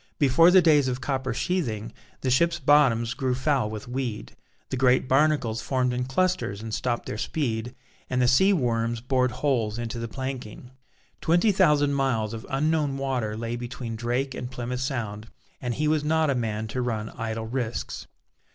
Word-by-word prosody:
Before 150 +5 +5
the 185 0 +6
days 150 -4 +5
of 125 0 -2
copper 130 0 -2
sheathing, 115 - -2 0.3
the 130 - 0
ships' 170 +6 +3
bottoms 130 -6 +3
grew 130 -3 -1
foul 130 -3 +1
with 110 0 -7
weed; 120 - -4 0.4
the - - 0
great 130 0 +3
barnacles 135 -5 +2
formed 125 +1 0
in 125 0 -1
clusters 175 - 0
and 110 0 -6
stopped 120 +2 -1
their 105 - -5
speed, 120 -5 -2 0.3
and 125 - 0
the 125 - +3
sea 190 +11 +5
worms 120 - 0
bored 125 +1 +1
holes 120 -4 -1
into 120 0 -4
the 115 - -3
planking. 130 -2 -6 0.5
Twenty 175 +6 +3
thousand 150 -7 +3
miles 125 -6 0
of 115 +1 -7
unknown 145 0 0
water 125 -6 -2
lay 115 +1 -3
between 120 -1 -5
Drake 120 +4 -1
and 125 - -5
Plymouth 125 -1 -4
Sound, 115 -6 -3 0.3
and 125 -2 -2
he 155 +1 0
was 155 -1 +2
not 155 -1 +2
a - - +2
man 110 -2 -2
to 130 - -2
run 110 -3 -2
idle 115 -1 -4
risks. 120 0 -4
125 Hz, 175 wpm, -26 LUFS, 115-140 Hz, 0.5 s, the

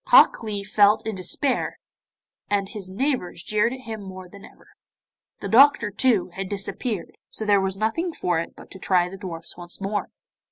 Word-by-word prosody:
Hok - - +7
Lee 210 -3 -4
felt 205 +1 +4
in 220 - -2
despair, 200 - -1 0.7
and 200 -1 +1
his 200 -5 -7
neighbours 200 - -2
jeered 215 +2 +1
at 260 0 -7
him 225 -4 -6
more 185 -1 -9
than 200 +2 -14
ever. - - -16 0.7
The - - -3
doctor, 235 -3 +6
too, 210 -3 +2
had 190 0 -4
disappeared, 205 -1 -3 0.2
so 220 - -4
there 205 -2 +4
was 190 0 -1
nothing 225 - 0
for 175 - 0
it 165 - -5
but - - -14
to 190 - -9
try 180 -1 +2
the 195 - -9
dwarfs 170 -4 -7
once 175 0 -5
more. 200 +1 -2
200 Hz, 185 wpm, -24 LUFS, 185-225 Hz, 0.7 s, Hok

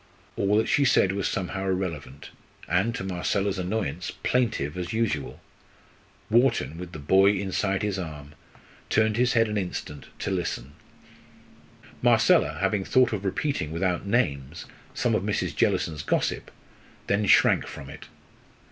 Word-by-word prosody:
All 100 +1 +2
that 110 - +2
she 145 - +3
said 110 -7 +4
was 100 -1 -1
somehow 95 +1 -3
irrelevant; 85 -7 -4 0.4
and, 95 +8 +1
to - - -4
Marcella's 95 +1 -1
annoyance, 90 -3 -2
plaintive 110 - 0
as 90 +1 -4
usual. 110 -12 -1 0.9
Wharton, 115 - +2
with 90 -1 -7
the 80 - -8
boy 95 +7 +4
inside 95 0 -1
his 100 -2 -1
arm, 75 -4 -7 0.6
turned 110 -1 +2
his 125 +2 +2
head 115 -1 +3
an 105 -1 -1
instant 90 -6 -6
to - - -3
listen. 80 -7 -3 1.3
Marcella, 75 - +4
having 100 0 +1
thought 125 +3 +3
of 100 -2 -3
repeating, 100 - -1
without 90 +3 -1
names, 75 - -1 0.3
some - - +1
of - - +1
Mrs. - - -2
Jellison's 75 -2 0
gossip, - - -1 0.6
then 100 0 +1
shrank - - +4
from 70 - -9
it. - - -11
95 Hz, 140 wpm, -26 LUFS, 85-105 Hz, 1.3 s, said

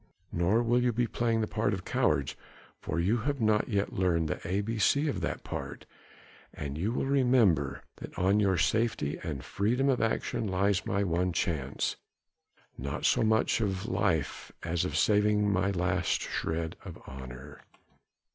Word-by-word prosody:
Nor 95 +8 +2
will 120 +1 +2
you 125 0 +2
be 120 +2 +1
playing 115 -1 0
the 110 - 0
part 105 -1 0
of 95 - -8
cowards, - - +1 0.4
for 80 - -3
you 100 +8 +2
have 140 +4 -2
not 110 0 +2
yet 100 -2 0
learned 85 -4 +1
the - - -3
A 95 +4 0
B 110 +2 -3
C 140 +9 +3
of 145 - -2
that - - -3
part, - - -6 0.7
and 70 -1 -5
you 95 +8 -1
will 125 - -1
remember 120 - +2
that - - -9
on 95 +3 +3
your 95 -3 +2
safety 105 -6 0
and 75 -6 -5
freedom 125 +7 +1
of 130 - +2
action 115 0 -1
lies 100 +2 +1
my 100 +1 +1
one 90 0 0
chance, 75 -9 -1 0.8
not 70 +2 -3
so - - +4
much 110 +1 +2
of 100 -2 -1
life 95 - -1
as 85 +1 0
of - - -2
saving 105 -1 +3
my 95 +1 +1
last 90 -1 0
shred 80 0 -3
of - - -8
honour." 65 +2 -9
100 Hz, 165 wpm, -30 LUFS, 85-115 Hz, 0.8 s, so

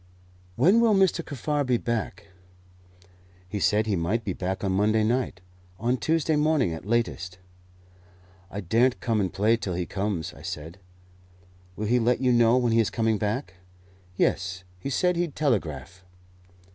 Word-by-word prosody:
"When 185 - +4
will 225 -3 +4
Mr. 190 -3 +2
Kaffar 145 +1 -2
be 125 -2 +1
back?" 110 -3 -3 1.2
"He 105 +3 -4
said 105 +5 +2
he 105 -3 0
might 95 +7 -1
be 95 - -2
back 95 +2 -4
on 95 - 0
Monday 105 +3 +2
night 115 -5 -1 0.4
on 120 +5 0
Tuesday 160 +2 +1
morning 150 - +2
at 80 +4 -8
latest." 100 -6 -1 1.1
"I 100 +2 -5
daren't 115 +8 +2
come 115 -3 0
and 95 - -1
play 110 +4 +2
till 100 -5 -4
he 90 0 -2
comes," 95 -4 -3
I 70 - -14
said. 85 +1 -7 1.0
"Will 105 - -4
he 120 +4 +2
let 120 +2 +2
you 130 -1 +2
know 120 0 +4
when 120 -2 +1
he 115 - +3
is 110 - +2
coming 110 -2 0
back?" 105 -3 -3 0.6
"Yes; 95 0 0 0.2
he 95 - -4
said 180 +5 +1
he'd 170 -4 -2
telegraph." 95 - -2
110 Hz, 160 wpm, -26 LUFS, 95-125 Hz, 1.2 s, When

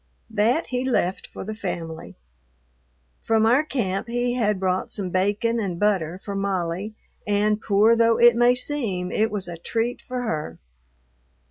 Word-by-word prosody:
That 225 +9 +2
he 250 0 -2
left 195 -8 0
for - - -8
the 215 +3 -5
family. 170 -6 -6 1.1
From 220 -1 +2
our 245 +5 +5
camp 200 -10 -2
he 245 +1 -1
had 210 -5 0
brought 185 0 -1
some 190 -4 -3
bacon 205 +5 +1
and 185 -5 -3
butter 185 -5 +1
for 200 - -4
Molly, 195 +1 -2 0.3
and, 210 +1 +1
poor 215 +3 +4
though 230 0 +3
it 240 -1 +6
may 240 +1 +4
seem, 230 -10 -2
it 220 +1 +1
was 200 -3 -3
a 170 -1 -6
treat 230 +7 -2
for 250 -1 -4
her. 150 - -3
210 Hz, 155 wpm, -24 LUFS, 185-235 Hz, 1.1 s, it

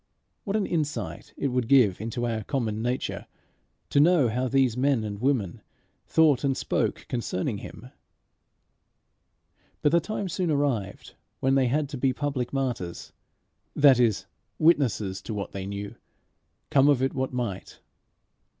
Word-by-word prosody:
What 200 -1 -2
an 210 -2 +1
insight 140 - -3
it 140 - -1
would 125 -2 -1
give 120 -8 +4
into 115 +2 -3
our 115 -2 -2
common 110 -3 -2
nature, 125 +2 -3 0.6
to 140 - +3
know 155 -5 +5
how 125 +4 -1
these 130 -3 +2
men 130 -2 +1
and 105 -1 -5
women 125 -9 0 0.5
thought 155 -5 +4
and 135 -2 +1
spoke - - -1
concerning 105 -4 -2
him! 125 +5 -11 1.9
But 150 - +4
the 170 - +5
time 200 +3 -4
soon 180 0 -2
arrived 135 -10 -1 0.3
when 135 +1 +2
they 135 -2 +3
had 145 +4 0
to 140 -3 -6
be 130 0 +2
public 135 -3 -2
martyrs 125 -11 -3 0.6
that 140 -4 +6
is, 115 -5 +2 0.3
witnesses 115 - +2
to 105 - -6
what 100 -1 -4
they 95 -1 -5
knew, 100 0 -5 0.8
come 140 +1 +5
of 135 -3 +3
it 135 - 0
what 130 0 -2
might. 120 -7 -5
130 Hz, 150 wpm, -26 LUFS, 110-145 Hz, 1.9 s, that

